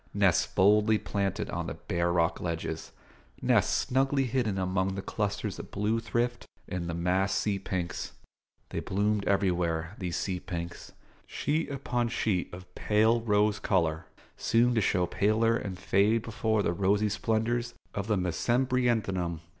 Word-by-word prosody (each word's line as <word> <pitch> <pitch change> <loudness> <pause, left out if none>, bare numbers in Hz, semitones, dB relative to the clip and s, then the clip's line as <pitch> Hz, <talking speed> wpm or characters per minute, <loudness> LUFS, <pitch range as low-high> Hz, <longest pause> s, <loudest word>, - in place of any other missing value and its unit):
nests - - +3
boldly 105 +3 +4
planted 100 -2 -2
on - - -3
the - - -4
bare 85 0 -1
rock 85 0 +1
ledges; 80 -2 -4 0.5
nests - - +3
snugly 135 +1 +2
hidden 120 -5 0
among 95 0 0
the 95 - -3
clusters 105 -1 -2
of - - -8
blue 105 +3 0
thrift 120 +1 -2 0.2
and 85 -2 -4
the - - -2
massed 90 +3 +1
sea 100 -2 0
pinks. 90 -2 -4 0.6
They - - -3
bloomed 100 +1 0
everywhere, 90 -4 +1
these 90 -3 -2
sea 95 -2 -2
pinks; 85 -1 -6 0.3
sheet 155 +3 -1
upon 125 -4 -1
sheet 105 -6 -1
of 90 0 -11
pale 110 +2 +2
rose 105 -1 +2
colour, 80 -4 0 0.3
soon 120 +2 +3
to 115 - +2
show 90 -2 +2
paler 110 +5 +2
and 95 -5 -4
fade 105 +5 +2
before 110 -1 0
the 85 - +1
rosy 100 +3 +2
splendours 115 +3 -1 0.2
of 100 0 -3
the 105 -2 +2
mesembryanthemum. 105 -3 0
100 Hz, 145 wpm, -29 LUFS, 90-115 Hz, 0.6 s, boldly